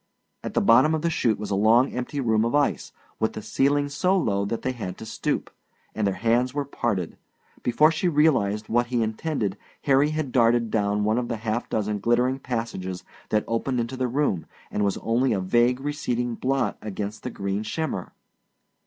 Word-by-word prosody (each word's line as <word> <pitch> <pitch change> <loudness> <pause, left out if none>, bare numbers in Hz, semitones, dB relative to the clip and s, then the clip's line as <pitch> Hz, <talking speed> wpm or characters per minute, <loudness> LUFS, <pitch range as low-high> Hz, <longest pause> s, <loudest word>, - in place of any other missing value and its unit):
At - - -5
the - - +3
bottom 155 +7 +5
of 155 - -3
the 170 - +1
chute 115 -8 +1
was 105 0 -5
a - - +2
long 115 +6 +4
empty 125 +3 -4
room 110 -4 +2
of 115 +4 0
ice, 145 -1 +1 0.3
with 110 - 0
the 110 - -6
ceiling 145 +5 +1
so 180 +7 +1
low 100 - 0
that 115 +3 -3
they 130 - 0
had 105 -7 -6
to 110 - -8
stoop 110 - -2 0.4
and 110 -2 0
their 95 - 0
hands 120 +3 +1
were 145 -1 -1
parted. 105 -10 -2 0.4
Before 150 +6 +4
she 165 +3 0
realized 130 - +2
what 120 +1 +1
he 120 -2 +1
intended 110 - -2 0.2
Harry 140 +1 +4
had 155 -4 -2
darted 115 -2 +3
down 105 -1 +1
one 110 +3 +2
of 120 - -3
the 115 -2 -3
half 110 +2 -3
dozen 105 -1 -1
glittering 125 +5 +2
passages 115 -8 -4 0.3
that 105 0 +2
opened 120 +2 -1
into 120 +2 -2
the 130 -1 -1
room 125 - 0 0.2
and 105 - 0
was 100 -1 +1
only 120 +3 +2
a 100 - 0
vague 120 +7 +2
receding 125 -4 -2
blot 135 +3 -1
against 105 0 -5
the - - -4
green 100 +1 -3
shimmer. 155 +9 -3
120 Hz, 195 wpm, -25 LUFS, 105-135 Hz, 0.4 s, bottom